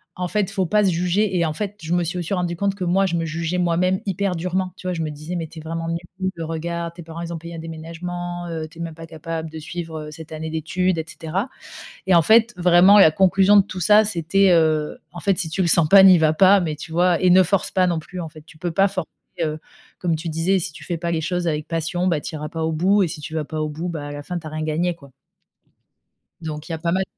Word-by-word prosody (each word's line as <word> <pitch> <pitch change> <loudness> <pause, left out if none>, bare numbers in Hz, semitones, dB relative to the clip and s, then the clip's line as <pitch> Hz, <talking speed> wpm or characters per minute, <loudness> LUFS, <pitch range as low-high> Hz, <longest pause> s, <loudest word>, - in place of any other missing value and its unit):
«En 180 0 -3
fait, 210 +4 0
il 195 -1 -3
faut 190 -3 0
pas 210 +2 +3
se 190 - +3
juger», 180 +3 0
et 170 - +2
en 155 - -2
fait, 205 +4 -5
je 160 - -6
me 175 - +2
suis 175 +2 -3
aussi 175 +3 -3
rendu 175 -1 -2
compte 200 +2 -1
que 190 - -5
moi, 190 +2 +2
je 170 - -2
me 165 -1 -1
jugeais 165 +2 -2
moi-même 180 +2 +1
hyper 195 -1 -1
durement. 180 +2 -2
Tu 185 - -14
vois, 180 - -1
je 165 - -3
me 155 - -2
disais: 155 +4 -6
«Mais 165 -2 -3
tu 160 - -16
es - - -9
vraiment 165 +1 -4
nulle, 175 +1 -4
regarde, 170 +1 -4
tes 175 - -10
parents 165 +1 -8
ils 170 0 -5
ont 165 - -5
payé 170 +1 -9
un - - -7
déménagement, 175 +2 -6
heu, 160 -1 -4
tu 165 - -18
es - - -5
même 165 -1 -5
pas 165 0 -10
capable 160 0 -5
de 160 - -9
suivre, 160 0 -6
heu, - - -9
cette 160 0 -11
année 160 0 -5
d'études», 170 +3 -1
et 160 - -3
cetera, 185 - -4 0.6
et 190 - +4
en 170 - +7
fait, 225 +6 +4
vraiment, 180 +3 +6
la 160 - +8
conclusion 195 +3 +4
de 200 - +7
tout 185 -2 -7
ça 210 +4 +6
c'était, 190 0 +2
heu, 155 -3 +2
en 175 - -7
fait, 195 +1 +1
si 165 -5 -2
tu 190 +4 -1
le 175 - +1
sens 165 -2 +4
pas, 195 -1 +9
n'y 185 -3 +8
va 155 -1 +4
pas, 195 +4 +6
mais 160 -4 -2
tu 155 +2 -10
vois 175 +1 +2
et 185 - +4
ne 185 - +7
force 195 0 0
pas 185 -1 +2
non 170 -2 0
plus, 180 +3 -8
en 160 - -6
fait, 155 -1 -14
tu 155 - -17
peux 175 0 -2
pas 195 +4 +3
forcer, 185 -4 -4 0.3
heu, 155 0 -2 0.4
comme 170 -2 0
tu 160 +1 -5
disais, 170 +5 +1
si 170 -2 -5
tu - - -12
fais 170 -2 -3
pas 170 +1 -3
les 160 -1 -1
choses 175 +1 -2
avec 150 -1 -2
passion, 165 +2 -2
bah, 160 -5 +1
tu 165 - -6
iras 150 0 -5
pas 165 0 -4
au 160 - 0
bout 190 +6 +3
et 180 - +1
si 155 -1 -7
tu 155 +2 -8
vas 155 -2 -2
pas 155 0 -4
au 155 - -2
bout, 160 +4 -4
bah, 150 -4 -5
à - - -6
la 145 0 -6
fin, 180 +2 -4
tu 160 - -15
as - - -6
rien 155 0 -4
gagné, 165 +3 0
quoi. 140 -4 -16 1.3
Donc 155 -1 -6
il - - -5
y - - -1
a - - -6
pas 170 0 -1
mal 190 +2 +1
170 Hz, 290 wpm, -22 LUFS, 160-185 Hz, 1.3 s, pas